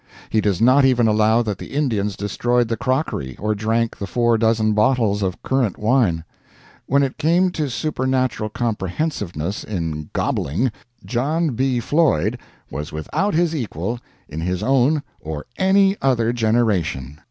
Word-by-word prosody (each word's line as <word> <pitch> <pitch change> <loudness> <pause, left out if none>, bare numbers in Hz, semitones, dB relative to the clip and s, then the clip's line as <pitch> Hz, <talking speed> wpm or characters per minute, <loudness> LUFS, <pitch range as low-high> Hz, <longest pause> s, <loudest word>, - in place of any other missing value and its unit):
He 110 - +2
does 100 -4 0
not 130 +4 +5
even 125 -3 +4
allow 110 +2 +3
that 105 -3 -3
the - - -9
Indians 105 -9 0
destroyed 120 +4 0
the 115 - 0
crockery 115 - -2
or 105 +1 -1
drank 110 +2 0
the 100 - -5
four 120 +2 +2
dozen 110 -1 +2
bottles 110 -2 +2
of 95 -2 -3
(currant) 130 -7 0
wine. 105 -8 +2 0.6
When 140 +1 +3
it 135 -1 -3
came 175 +4 +3
to 155 -5 -2
supernatural 130 -4 -1
comprehensiveness 105 - -3
in 80 -6 -4
"gobbling," 110 - 0 0.3
John 150 +6 0
B. 130 +1 0
Floyd 145 - +1 0.3
was 75 +3 -5
without 155 - -1
his 165 -1 +2
equal, 115 - -3 0.3
in 80 - -6
his 90 +1 -2
own 135 +3 +2 0.2
or 75 -1 -6
any 195 +1 +4
other 120 -3 +2
generation. 100 - 0
115 Hz, 145 wpm, -21 LUFS, 100-135 Hz, 0.6 s, not